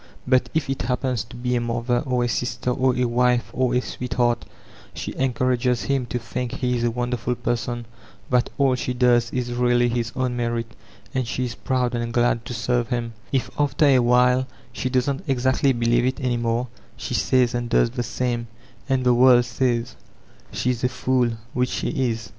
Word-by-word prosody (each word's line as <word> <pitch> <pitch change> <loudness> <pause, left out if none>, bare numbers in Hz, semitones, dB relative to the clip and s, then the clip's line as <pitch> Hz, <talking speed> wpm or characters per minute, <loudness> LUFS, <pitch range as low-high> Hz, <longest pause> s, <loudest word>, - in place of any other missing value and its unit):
But 130 0 +2
if 160 -4 +1
it 135 0 -2
happens 125 -2 -1
to - - -13
be 125 0 -1
a 120 - +1
mother 120 +1 0
or 125 -1 +1
a - - +1
sister 125 +1 -1
or 130 0 +2
a 125 0 +1
wife 120 -2 +1
or 125 -1 +1
a 125 - +3
sweetheart, 120 -2 -1 0.5
she - - -5
en 135 -1 +1
courages 125 0 +1
him 135 -3 0
to 125 - -2
think 120 +1 -4
he 125 -1 -1
is 120 - -1
a 120 - +3
wonderful 120 0 -2
person, 120 0 -2 0.5
that 125 0 +3
all 135 -2 +3
she 125 0 -2
does 120 -1 +3
is 120 -1 -3
really 120 0 +2
his 120 0 -2
own 125 -1 -1
merit, 120 -1 -1 0.5
and 130 -2 -1
she 130 +1 -2
is 120 - -4
proud 125 0 -1
and 120 -1 -2
ghid 120 -1 +2
to 120 - -5
serve 120 +1 0
hint 120 -2 -2 0.2
If 135 -2 -1
after 145 +1 +2
a 135 -3 +5
while 125 +1 +3 0.3
she 130 - -2
doesn't 130 +2 0
exactly 130 +1 +2
believe 120 0 +2
it 130 - -2
any 125 -3 0
more, 120 +1 -1 0.3
she - - -5
says 125 -1 +2
and 120 -1 -2
does 115 -1 +3
the 125 0 -3
same; 120 0 -2 0.4
and 130 -1 +2
the 125 -1 +4
world 120 0 +6
says 120 0 -1 0.6
she 125 - 0
is 125 -1 -4
a 125 - +3
fool,— 125 -2 +1 0.2
which 125 0 +1
she - - -2 0.2
is. 115 -2 -4
125 Hz, 200 wpm, -23 LUFS, 120-125 Hz, 0.6 s, world